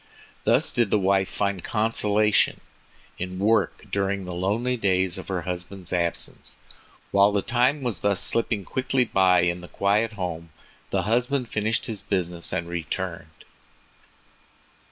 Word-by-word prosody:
Thus - - +3
did 120 -4 +1
the 105 - +3
wife 95 -1 +2
find 100 -3 -1
consolation 105 -1 +2 0.6
in 90 +1 -4
work 105 -1 +1
during 100 -1 -1
the 90 - -5
lonely 105 +8 0
days 95 -4 +1
of - - -9
her 95 -3 -2
husband's 90 +1 -5
absence. 85 -1 -2 0.6
While 100 +1 +5
the 100 -2 0
time 130 +4 +2
was 110 -10 -2
thus 100 -2 +1
slipping 115 -4 +1
quickly 130 +2 0
by 95 -4 +4
in 90 0 0
the 90 - -10
quiet 105 +5 +1
home, 85 -4 -5 0.4
the - - 0
husband 125 +3 0
finished 110 +1 -1
his 110 -3 -4
business 90 -3 -2
and 85 - -2
returned. 85 -1 -5
100 Hz, 140 wpm, -25 LUFS, 90-110 Hz, 0.6 s, While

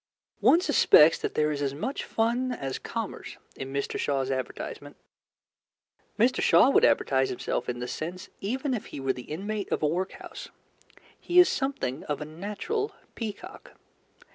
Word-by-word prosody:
One 340 - +5
suspects 165 - +6
that - - -3
there 150 0 +2
is 145 -1 -3
as 140 -1 -1
much 235 - -3
fun 240 +3 0
as 135 - -4
commerce - - -6 0.2
in 135 0 -6
Mr. 140 0 -2
Shaw's 135 -2 0
advertisement. 130 -2 -5 1.2
Mr. 240 +4 +3
Shaw 265 - +6
would - - +4
advertise 130 -1 +3
himself 125 - -3
in 120 - -2
this 125 0 -4
sense 180 +4 -6
even 260 +7 -2
if 225 - -4
he - - -8
were 135 -1 0
the 125 - -10
inmate 200 +5 -4
of - - -1
a - - +4
workhouse. 180 +5 -4 0.7
He 350 - -1
is 360 - +9
something 270 - -2
of 150 - -2
a 150 - -5
natural 210 - -4 0.2
peacock. 215 -4 -7
175 Hz, 160 wpm, -27 LUFS, -, 1.2 s, is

